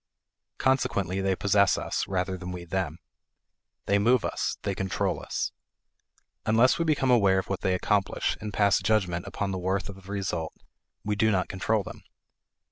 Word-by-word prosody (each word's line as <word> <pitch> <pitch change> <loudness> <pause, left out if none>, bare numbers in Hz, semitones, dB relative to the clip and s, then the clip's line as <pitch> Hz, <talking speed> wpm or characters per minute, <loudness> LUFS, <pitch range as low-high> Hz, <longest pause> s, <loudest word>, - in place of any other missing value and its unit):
Consequently 100 -8 +1
they 95 -1 +1
possess 100 0 +3
us, - - -2
rather 95 0 -1
than 90 0 -6
we 90 -1 -6
them. 85 -3 -2 0.9
They 100 0 +3
move 120 +3 +3
us; - - -2
they 100 - -1
control 95 0 -1
us. - - -3 0.9
Unless 115 +7 +4
we 170 - +1
become 140 -5 +2
aware 100 -6 +4
of 95 - -2
what 95 - -2
they 95 -1 +1
accomplish, 100 +1 0
and 105 - -4
pass 100 0 +3
judgment 95 -5 0
upon 100 -1 -3
the 95 - -3
worth 95 +2 -1
of 100 - -7
the 95 - -10
result, 95 -5 -3 0.5
we 105 0 0
do 110 +2 +3
not 95 -3 +1
control 100 +2 0
them. - - -9
95 Hz, 170 wpm, -27 LUFS, 95-105 Hz, 0.9 s, Unless